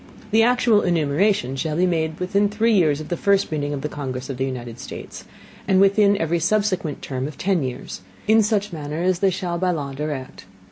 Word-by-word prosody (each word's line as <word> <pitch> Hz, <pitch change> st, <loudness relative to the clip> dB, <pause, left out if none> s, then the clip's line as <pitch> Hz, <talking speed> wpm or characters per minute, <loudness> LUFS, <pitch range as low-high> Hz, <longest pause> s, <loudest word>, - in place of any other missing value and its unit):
The 220 Hz, +1 st, +5 dB
actual 235 Hz, -2 st, +4 dB
Enumeration 160 Hz, -3 st, +1 dB
shall 150 Hz, +3 st, -2 dB
be 180 Hz, +3 st, +3 dB
made 160 Hz, -3 st, -1 dB
within 200 Hz, +3 st, +1 dB
three 220 Hz, +2 st, +1 dB
Years 155 Hz, -7 st, +3 dB
after 155 Hz, -, -8 dB
the 175 Hz, -, -3 dB
first 200 Hz, -3 st, +2 dB
Meeting 145 Hz, -2 st, -2 dB
of 140 Hz, -2 st, -3 dB
the 150 Hz, -, -2 dB
Congress 135 Hz, -3 st, -5 dB
of 130 Hz, -, -6 dB
the 130 Hz, -, 0 dB
United 120 Hz, -3 st, -6 dB
States, 130 Hz, -, -9 dB, 0.4 s
and 190 Hz, -1 st, +4 dB
within 200 Hz, +1 st, +4 dB
every 165 Hz, 0 st, 0 dB
subsequent 185 Hz, -4 st, 0 dB
Term 130 Hz, 0 st, -3 dB
of 150 Hz, -, -9 dB
ten 190 Hz, -3 st, +1 dB
Years, 125 Hz, -7 st, -5 dB, 0.3 s
in 220 Hz, +1 st, +6 dB
such 210 Hz, -2 st, 0 dB
Manner 155 Hz, +1 st, -4 dB
as 185 Hz, -1 st, +1 dB
they 195 Hz, -, +3 dB
shall 175 Hz, -2 st, -3 dB
by 185 Hz, 0 st, +1 dB
law 145 Hz, -6 st, -2 dB
Direct. 140 Hz, -5 st, -5 dB
170 Hz, 205 wpm, -22 LUFS, 145-200 Hz, 0.4 s, in